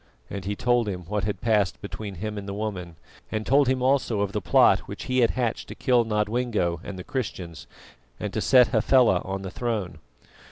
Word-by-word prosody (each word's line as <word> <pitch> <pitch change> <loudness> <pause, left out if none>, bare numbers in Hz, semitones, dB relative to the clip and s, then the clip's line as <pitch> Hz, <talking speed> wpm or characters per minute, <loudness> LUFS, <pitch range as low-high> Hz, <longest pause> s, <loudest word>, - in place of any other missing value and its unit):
And 100 -2 -5
he 100 +1 -2
told 120 0 +1
him 90 -2 -4
what 100 +3 -3
had 100 -3 -3
passed 105 -5 +1
between 100 -1 -7
himself 105 +3 -4
and 100 - -9
the 100 - -4
woman, 95 -5 -4 0.4
and 110 -1 -2
told 140 +1 +4
him 130 0 +1
also 130 -5 +2
of 100 -1 -1
the - - -2
plot - - +5
which - - -7
he 130 0 0
had 115 -2 +4
hatched 120 -3 -2
to - - -8
kill 125 -3 +2
Nodwengo 105 -5 0
and 100 - -7
the 90 - -7
Christians, 90 - -5 0.5
and 105 - -4
to 110 - -1
set 125 0 +5
Hafela 120 -4 +4
on 95 0 -4
the 95 - -6
throne. 105 -9 -3
105 Hz, 205 wpm, -25 LUFS, 95-120 Hz, 0.5 s, plot